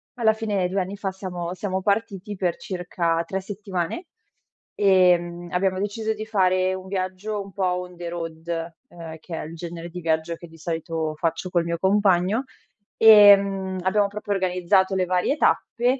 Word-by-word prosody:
alla 225 -3 +3
fine 210 -4 -1
2 195 +2 -1
anni 190 +2 -3
fa 195 -1 -3
siamo 180 -2 -5
siamo 190 0 -3
partiti 205 0 -1
per 180 -2 0
circa 175 -2 -2
3 190 +2 -3
settimane. 195 - -4 0.7
Ehm, 175 -3 +3
abbiamo 185 +1 0
deciso 215 +2 -2
di 215 0 -6
fare 185 -3 +2
un 190 0 -7
viaggio 190 +2 -3
un 195 -1 -11
po' 195 - -2 0.2
on 180 0 -8
the 175 0 -6
road 165 0 -5 0.2
uhm, 165 -2 -9
che 175 - -10
è - - -5
il 160 +2 -9
genere 170 0 -7
di 180 +1 -7
viaggio 160 0 0
che 175 - -12
di 165 - -16
solito 160 -1 -3
faccio 165 +3 -2
col 175 -1 +1
mio 170 0 -2
compagno, 195 +3 +2 0.5
ehm, 200 -3 +6
abbiamo 200 +2 +2
proprio 205 0 -3
organizzato 190 0 +2
le 185 -1 +1
varie 180 - +1
tappe, 250 -2 +1
185 Hz, 170 wpm, -24 LUFS, 175-200 Hz, 0.7 s, ehm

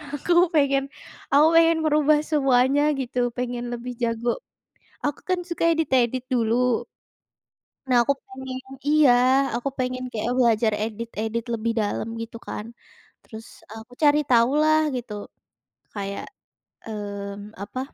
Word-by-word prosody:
Aku 345 +4 0 0.2
pengen 275 -2 +3 0.5
aku 295 +3 +6
pengen 330 0 +5
merubah 300 0 +4
semuanya 270 -1 +3 0.2
gitu, 250 -1 -3 0.2
pengen 245 -1 -3
lebih 245 +1 -5
jago. 235 +1 0 0.7
Aku 290 -1 -2
kan 370 -1 +1
suka 340 - -3
edit-edit 260 -6 +1
dulu 240 +1 +1 1.0
nah 255 -2 +2
aku 280 +4 +1
pengen 260 0 -7 0.3
iya, 300 -3 +5 0.4
aku 245 +3 -1
pengen 255 0 -2
kayak 230 +2 -2
belajar 225 -2 +3
edit-edit 225 0 -4
lebih 230 +1 -1
dalam 210 +1 -2
gitu 230 0 -8
kan. 210 - -5 0.6
Terus, 220 0 -11 0.2
eee, 220 +1 -9
aku 245 - -23
cari 295 0 +5
tahu 235 0 +5
lah 310 0 +4 0.2
gitu 240 -3 -6 0.8
kayak, 200 -1 -4 0.6
mmm, 205 -1 -7
apa 255 +5 -6
245 Hz, 125 wpm, -24 LUFS, 225-280 Hz, 1.0 s, aku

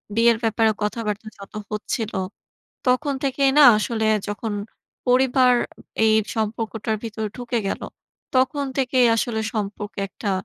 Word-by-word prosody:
বিয়ের 230 0 +5
ব্যাপারে 220 0 +3
কথাবার্তা 210 0 -2
যত 200 - -12 0.2
হচ্ছিল, 215 +1 -3 0.7
তখন 275 +3 +2
থেকেই 275 0 +2
না - - +9 0.2
আসলে 220 0 -1 0.2
যখন 210 +1 -3 0.5
পরিবার 255 0 +4 0.5
এই 220 -1 +4
সম্পর্কটার 220 0 -2
ভিতরে 220 -1 -3
ঢুকে 245 -1 -2
গেল, - - -3 0.5
তখন 265 +3 +2
থেকেই 255 -2 +3
আসলে 225 -1 -1
সম্পর্কে 205 -1 -4
একটা 200 +2 -4
225 Hz, 120 wpm, -23 LUFS, 215-250 Hz, 0.7 s, না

